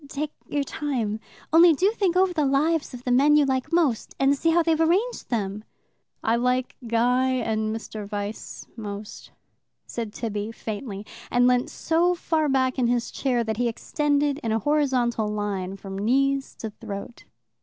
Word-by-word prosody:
Take 300 +2 -3 0.2
your 290 -1 0
time. 250 -8 -2 0.3
Only 335 +1 +8
do 375 +8 +2
think 390 -6 0
over 375 -1 +3
the 310 -3 +1
lives 295 +3 +1
of 250 -2 -9
the 250 - -1
men 280 +4 +5
you 300 -1 +5
like 265 +3 -1
most, 315 -10 +1
and 275 +1 +4
see 330 +4 +1
how 335 +1 +4
they've 325 -1 +2
arranged 385 +10 +1
them." 210 -3 -2 0.6
"I 225 +1 +2
like 250 +1 0
Guy 250 +3 +2
and 220 -3 -1
Mr. 215 -2 -7
Vyse 205 +1 -5
most," 210 -2 -7 0.6
said 230 -3 -5
Tibby 210 -1 -4
faintly, 210 -2 -6 0.2
and 245 0 +3
leant 250 0 +3
so 345 +2 +1
far 315 -3 0
back 260 -1 +1
in 245 - +3
his 240 0 0
chair 250 -3 0
that 220 -1 -3
he 245 0 +1
extended 290 +4 0
in 225 - -2
a 220 - +2
horizontal 250 -4 +1
line 200 -2 -3
from 195 0 -7
knees 275 +5 +1
to 220 - -6
throat. 205 +1 -8
250 Hz, 170 wpm, -25 LUFS, 220-295 Hz, 0.6 s, Only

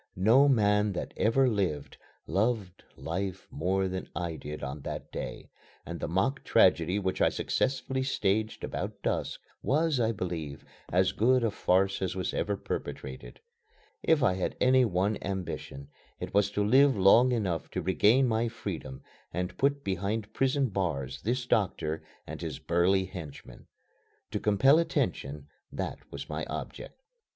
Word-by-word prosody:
No 115 +10 +5
man 105 -4 +3
that - - -5
ever 130 +5 +3
lived, 95 - -1 0.3
loved 100 -3 -1
life 95 +3 -4
more 95 +5 0
than 95 0 -5
I 85 -2 -3
did 75 -1 -7
on 70 +1 -5
that - - -6
day, - - -6 0.3
and - - -6
the - - -3
mock 95 - 0
tragedy 90 -4 +4
which 95 -2 -1
I - - +5
successfully 130 0 -1
staged 110 -4 0
about - - -4
dusk - - -1 0.2
was, 155 0 +1
I 115 -1 +2
believe, 85 -8 -5 0.3
as 90 +1 +3
good 125 +3 +3
a 115 - +1
farce 95 0 +1
as 95 -1 -1
was 95 - -2
ever 100 -1 -1
perpetrated. 65 -7 -6 0.6
If 160 -4 +3
I 105 - +4
had 90 0 -3
any 130 0 +5
one 100 +1 0
ambition 90 -7 -5 0.3
it - - -6
was 100 0 +3
to 105 0 +1
live 135 +3 +5
long 115 +7 +6
enough 95 -9 -1
to - - -3
regain 110 +8 +4
my 115 0 +1
freedom 95 - -6 0.3
and 90 +1 -3
put 140 +1 +1
behind 100 +3 -2
prison 135 0 +1
bars 70 -9 -2
this 120 +3 -1
doctor 85 -9 0 0.2
and - - -7
his - - -4
burly 90 +3 +2
henchmen. 85 -6 -10 0.6
To - - -1
compel 120 +9 +5
attention 75 - -1 0.3
that - - -4
was - - -7
my - - -4
object. - - -7
100 Hz, 150 wpm, -29 LUFS, 90-120 Hz, 0.6 s, long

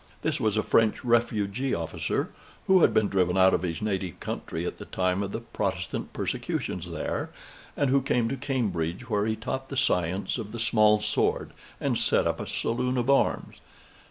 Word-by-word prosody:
This - - 0
was 110 -1 +1
a 110 - +2
French 110 +2 +2
refugee 115 +1 +1
officer, 85 -1 -2 0.3
who 190 -1 +5
had - - +6
been 110 -1 +3
driven 90 -2 +1
out 95 0 +6
of - - +2
his 90 +2 -3
native 95 -5 -2
country 80 +1 -4
at - - -4
the - - -7
time 90 +1 0
of 100 -1 -3
the 115 - -4
Protestant 95 -6 -3
persecutions 90 -1 -3
there, 85 -2 -3 0.5
and 140 -3 +2
who 140 0 +4
came 125 -3 +1
to 135 - -1
Cambridge, 115 - -2
where 105 0 +2
he 110 - 0
taught 130 +4 -4
the 135 - -4
science 95 -5 +1
of 105 -1 -6
the 120 - -5
small 110 -2 +4
sword, - - 0 0.3
and - - 0
set - - +2
up - - 0
a - - -5
saloon 125 +2 -1
of 125 +2 +2
arms. 140 - +1
110 Hz, 185 wpm, -27 LUFS, 95-125 Hz, 0.5 s, had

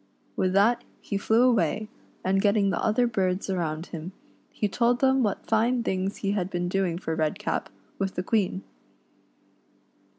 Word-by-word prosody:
With 185 0 +1
that 210 +5 +3 0.2
he 200 - -5
flew 225 +4 +3
away, 215 -4 +2 0.4
and 195 +1 +2
getting 200 -1 +3
the - - -1
other 225 +3 +3
birds 195 -4 0
around 165 -3 -2
him, 170 +3 -6 0.4
he 210 - -1
told 240 +4 +1
them 265 0 +3
what 210 -5 -1
fine 235 +2 +2
things 190 -1 -1
he 195 - +2
had 190 -3 -1
been 175 -1 -2
doing 180 -2 0
for 160 -2 -3
Redcap, 160 +7 -1 0.3
with 195 -1 -2
the 180 - -2
Queen. 195 -2 0
195 Hz, 160 wpm, -26 LUFS, 185-220 Hz, 0.4 s, that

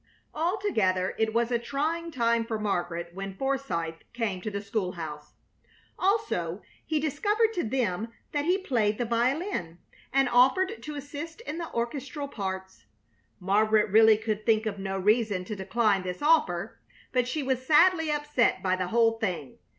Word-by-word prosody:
Altogether 305 - 0
it 220 0 +2
was 235 +2 +1
a 240 - +2
trying 315 +7 -2
time 235 -5 +1
for 225 -1 -3
Margaret 175 -4 -2
when 195 +1 -6
Forsythe 175 -13 -2
came 220 -6 -2
to 215 - -3
the 200 -1 -3
school 200 -2 -2
house. 150 -3 -7 0.7
Also, 370 - 0 0.2
he 315 -1 0
discovered 415 - +1
to 355 - -1
them 225 -3 -1 0.2
that 290 0 -1
he 360 +3 +3
played 225 - 0
the 240 - -1
violin, 235 - -1 0.3
and 270 0 +3
offered 265 - +3
to 300 -1 -6
assist 290 +6 -7
in 340 -8 -5
the 335 - -5
orchestral 270 +4 -3
parts. 190 - -6 0.5
Margaret 210 +2 +2
really 220 0 +7
could 215 -1 -3
think 220 0 +2
of 200 -2 -3
no 195 0 -3
reason 205 -1 +2
to 210 - -5
decline 200 +1 +1
this 180 +8 -5
offer, 215 - +2 0.3
but 250 -2 +1
she 290 +3 -2
was 260 -1 -1
sadly 325 +3 +4
upset 295 -9 +1
by 185 -1 +2
the 185 -1 -2
whole 225 +2 +2
thing. 175 - -3
230 Hz, 160 wpm, -28 LUFS, 195-290 Hz, 0.7 s, really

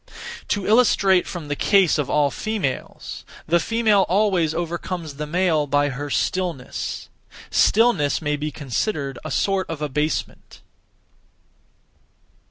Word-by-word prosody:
(To 200 -3 -1
illustrate 200 -5 +4
from) 170 -4 -6
the 145 - -2
case 190 -1 +3
of 145 - -1
all 145 -2 +2
females: 205 -11 -4 0.2
the 170 +2 +3
female 220 +1 +2
always 185 -4 +2
overcomes 170 -1 -4
the 150 0 -4
male 160 -2 +1
by 145 +1 +2
her 145 +2 -5
stillness. 175 -4 -2 0.4
Stillness 210 -10 +3
may 150 -1 -1
be 150 +1 -3
considered 140 - -3
(a - - -5
sort 195 -1 0
of) 165 -3 -4
abasement. 150 +1 -3
165 Hz, 120 wpm, -22 LUFS, 145-195 Hz, 0.4 s, illustrate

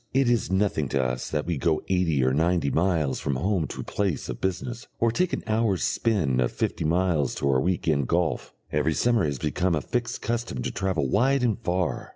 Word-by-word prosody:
It 135 -3 +4
is 120 - +1
nothing 95 -8 +1
to 70 -1 +1
us 60 0 -2
that 75 -1 -2
we 85 -3 -1
go 80 +1 +1
eighty 85 -7 +2
or 65 0 +2
ninety 80 0 +1
miles 80 -5 +1
from 70 - -1
home 90 +2 0
to - - -6
place 100 -6 -2
of - - -5
business, 110 +6 -3
or 115 0 +3
take 180 +8 0
an - - -3
hour's 110 -6 +1
spin 80 - +1
of - - +1
fifty - - -2
miles 80 -4 +1
to 70 - 0
our 65 -1 +2
week 90 +2 -1
end 70 -5 +2
golf; 85 -1 0 0.2
every 75 +1 +1
summer 120 -2 +2
it 80 - +1
has 70 -2 -2
become 85 +6 0
a - - +1
fixed 120 0 -3
custom 115 - -2
to - - -2
travel 95 -7 -1
wide 130 - +2
and 115 -2 +1
far. 90 -5 -2
90 Hz, 215 wpm, -26 LUFS, 75-110 Hz, 0.2 s, It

